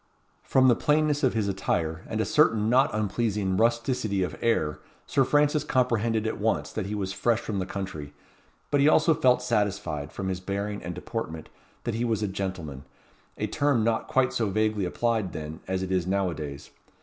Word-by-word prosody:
From 130 Hz, -1 st, +3 dB
the 120 Hz, -, +6 dB
plainness 150 Hz, +1 st, +2 dB
of 130 Hz, -5 st, +2 dB
his 110 Hz, -2 st, +1 dB
attire, 85 Hz, -4 st, -1 dB
and 110 Hz, -, -3 dB
a 110 Hz, -, +1 dB
certain 115 Hz, -8 st, +3 dB
not 135 Hz, +4 st, +5 dB
unpleasing 105 Hz, -2 st, -1 dB
rusticity 115 Hz, -2 st, +1 dB
of 90 Hz, -, -3 dB
air, 80 Hz, -10 st, +1 dB, 0.3 s
Sir 140 Hz, -, +2 dB
Francis 145 Hz, +2 st, +2 dB
comprehended 115 Hz, -5 st, +1 dB
at 110 Hz, -, -2 dB
once 110 Hz, +2 st, 0 dB
that 105 Hz, -3 st, -3 dB
he 105 Hz, -, -3 dB
was 95 Hz, -2 st, -3 dB
fresh 115 Hz, +1 st, +1 dB
from 105 Hz, -3 st, -3 dB
the 95 Hz, -, -3 dB
country; 80 Hz, -8 st, -5 dB, 0.6 s
but 145 Hz, -, +3 dB
he 145 Hz, -, +6 dB
also 160 Hz, +1 st, +5 dB
felt 125 Hz, -3 st, +3 dB
satisfied, 105 Hz, -10 st, -1 dB
from 95 Hz, 0 st, -4 dB
his 95 Hz, -1 st, -2 dB
bearing 100 Hz, +2 st, -3 dB
and 90 Hz, 0 st, -5 dB
deportment, 90 Hz, -5 st, -5 dB, 0.3 s
that 120 Hz, -, -2 dB
he 115 Hz, +2 st, -1 dB
was 110 Hz, -3 st, 0 dB
a -, -, +1 dB
gentleman: 95 Hz, -8 st, -5 dB, 0.5 s
a -, -, -1 dB
term 140 Hz, -6 st, +1 dB
not 115 Hz, 0 st, 0 dB
quite 130 Hz, -1 st, +2 dB
so 115 Hz, -3 st, 0 dB
vaguely 110 Hz, -1 st, +1 dB
applied 110 Hz, 0 st, -1 dB
then, 80 Hz, 0 st, -6 dB
as 95 Hz, 0 st, -1 dB
it 95 Hz, -, -4 dB
is 90 Hz, -2 st, 0 dB
now 95 Hz, -1 st, +1 dB
a -, -, -4 dB
days. 70 Hz, -2 st, -7 dB
105 Hz, 195 wpm, -27 LUFS, 95-120 Hz, 0.6 s, the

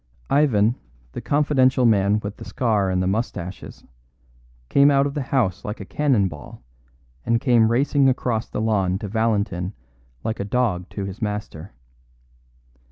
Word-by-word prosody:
Ivan, 120 Hz, -6 st, +3 dB, 0.3 s
the -, -, -6 dB
confidential 135 Hz, -3 st, +2 dB
man 105 Hz, -1 st, +3 dB
with 100 Hz, 0 st, -6 dB
the -, -, -9 dB
scar 105 Hz, -6 st, 0 dB
and 90 Hz, 0 st, 0 dB
the -, -, 0 dB
moustaches, 95 Hz, -3 st, -4 dB, 0.8 s
came 140 Hz, -, +5 dB
out 140 Hz, -1 st, +3 dB
of 140 Hz, -, -3 dB
the 145 Hz, -, -2 dB
house 130 Hz, -8 st, -1 dB
like 105 Hz, +1 st, -5 dB
a 100 Hz, -, -7 dB
cannon 130 Hz, -6 st, +1 dB
ball, 75 Hz, -6 st, -11 dB, 0.6 s
and 115 Hz, 0 st, +1 dB
came 115 Hz, -3 st, +3 dB
racing 135 Hz, +2 st, +3 dB
across 120 Hz, -3 st, -1 dB
the -, -, -3 dB
lawn 100 Hz, -4 st, +1 dB
to 105 Hz, +1 st, -6 dB
Valentin 105 Hz, -4 st, -1 dB, 0.5 s
like 110 Hz, -, -3 dB
a -, -, -1 dB
dog 100 Hz, -5 st, -1 dB
to 100 Hz, -, -5 dB
his 100 Hz, +5 st, -8 dB
master. 105 Hz, -4 st, -5 dB
110 Hz, 155 wpm, -22 LUFS, 100-130 Hz, 0.8 s, came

